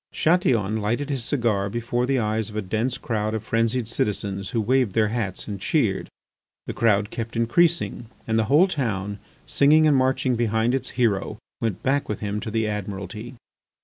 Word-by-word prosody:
Chatillon 120 - +2
lighted 120 +8 -1
his 135 -4 -2
cigar 115 -7 0
before 120 +3 -1
the 135 0 +2
eyes 110 -2 -1
of 105 - -11
a 110 - -1
dense 110 +6 -1
crowd 110 -1 -2
of 110 - -4
frenzied 115 +1 0
citizens 100 -3 -2
who 120 - -1
waved 120 -1 +2
their 110 -2 +2
hats 105 -5 -3
and 100 -3 -5
cheered. 110 -7 0 0.6
The - - -4
crowd 105 -2 +2
kept 115 0 -5
increasing, 120 +2 +1 0.2
and 110 0 +2
the 110 - +2
whole 150 - +5
town, 105 - -2 0.3
singing 155 +3 +4
and 150 -2 +4
marching 130 -1 +2
behind 115 +1 +1
its 130 -1 -1
hero, 110 -6 +1 0.2
went 110 -6 -2
back 140 +2 +1
with 105 - -3
him 105 0 -3
to 110 - -5
the 110 0 0
Admiralty. 105 +3 -5
115 Hz, 180 wpm, -24 LUFS, 105-130 Hz, 0.6 s, whole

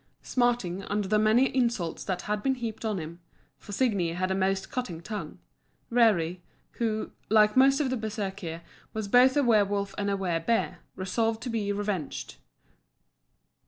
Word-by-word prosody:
Smarting 240 -7 0
under 205 -1 -1
the 210 +2 +3
many 225 +5 +3
insults 235 -10 0
that 185 -2 -2
had 210 0 -2
been 265 +2 +1
heaped 235 -3 -5
on 215 -3 -1
him 165 0 -7 0.4
for 205 - -11
Signi 200 -7 +1
had 185 +1 -1
a - - +2
most 190 0 0
cutting 250 -11 -3
tongue 210 +5 -6 0.5
Rerir, 200 -8 +3 0.4
who, 220 -2 -1 0.2
like 210 -1 +5
most 270 +2 +5
of 275 -4 0
the 260 - 0
Bersekir, 200 -6 -4 0.3
was 220 -2 -3
both 250 +6 +5
a 290 - +4
werwolf 205 -4 +2
and 200 0 0
a 200 - 0
wer 175 -4 0
bear, 225 +8 0 0.2
resolved 225 +4 -1
to 250 - -3
be 210 -3 -1
revenged. 200 -7 -3
210 Hz, 160 wpm, -28 LUFS, 190-235 Hz, 0.5 s, like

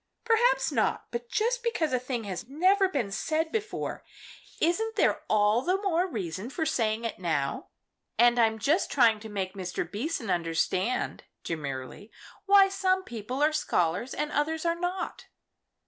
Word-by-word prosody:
"Perhaps 470 +2 +3
not. - - 0
But 235 0 -5
just 480 +3 0
because 395 - -1
a 255 - +2
thing 245 -2 -4
has 200 +2 -5
never 375 +6 +3
been 245 - -2
said 315 +9 -1
before, 435 -1 -3 0.6
isn't 445 +7 +1
there - - +2
all 215 +2 +3
the 365 +6 +1
more 370 -3 +1
reason 190 - -4
for 320 +4 -2
saying 225 -4 0
it 225 - -4
now? 155 -6 -1 0.5
And 240 0 +5
I'm 220 -1 +3
just 295 - +1
trying 230 -5 +4
to 220 +1 -9
make 190 -3 -3
Mr. 185 -2 -3
Beason 225 - -3
understand" 175 +6 -1 0.2
demurely 145 - -5 0.4
"why 395 0 +7
some 380 -1 +1
people 245 - -4
are 305 +1 +3
scholars 180 - 0
and 300 0 -2
others 315 +3 -1
are 335 - +3
not." 355 +2 -4
255 Hz, 155 wpm, -28 LUFS, -, 0.6 s, why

